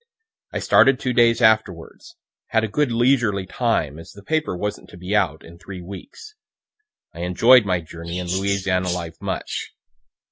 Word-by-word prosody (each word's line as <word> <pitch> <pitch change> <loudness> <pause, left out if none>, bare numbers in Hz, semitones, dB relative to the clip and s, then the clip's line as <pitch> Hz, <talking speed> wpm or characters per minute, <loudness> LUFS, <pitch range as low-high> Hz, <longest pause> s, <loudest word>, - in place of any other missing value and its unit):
I - - -3
started 135 -1 +4
two 125 - -2
days 115 -1 +3
afterwards; 110 -7 0 0.3
had 110 - +1
a - - 0
good 140 +5 0
leisurely 115 -5 +2
time, 90 - -1
as 80 - -12
the 100 - -14
paper 155 - -1
wasn't 105 +3 -5
to - - -13
be 90 +4 -3
out 80 -7 0
in 85 +1 -14
three 95 -1 -9
weeks. 100 - -11 0.8
I 85 - -11
enjoy'd 110 +8 +5
my 90 -2 0
journey 85 +2 -8
and 90 - -5
Louisiana 95 0 0
life 85 -2 -5
much. - - -5
100 Hz, 165 wpm, -22 LUFS, 90-115 Hz, 0.8 s, enjoy'd